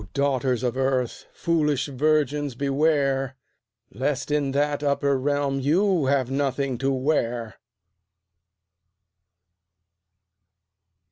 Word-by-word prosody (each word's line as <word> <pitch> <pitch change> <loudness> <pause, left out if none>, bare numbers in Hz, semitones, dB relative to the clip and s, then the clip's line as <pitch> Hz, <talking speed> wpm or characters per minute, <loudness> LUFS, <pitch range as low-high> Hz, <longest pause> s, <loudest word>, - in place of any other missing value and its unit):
daughters 130 -3 0
of 125 -1 0
Earth! 130 -2 -1
foolish 150 -5 0
virgins, 145 -1 0
beware! 135 -1 +1 0.6
Lest 135 +6 -2
in 145 -2 +1
that 145 +1 0
upper 140 -1 +1
realm 140 0 0
you 165 +2 +2
have 135 -2 +1
nothing 135 -2 -1
to 135 - 0
wear! 125 -4 -1
140 Hz, 85 wpm, -24 LUFS, 130-145 Hz, 0.6 s, you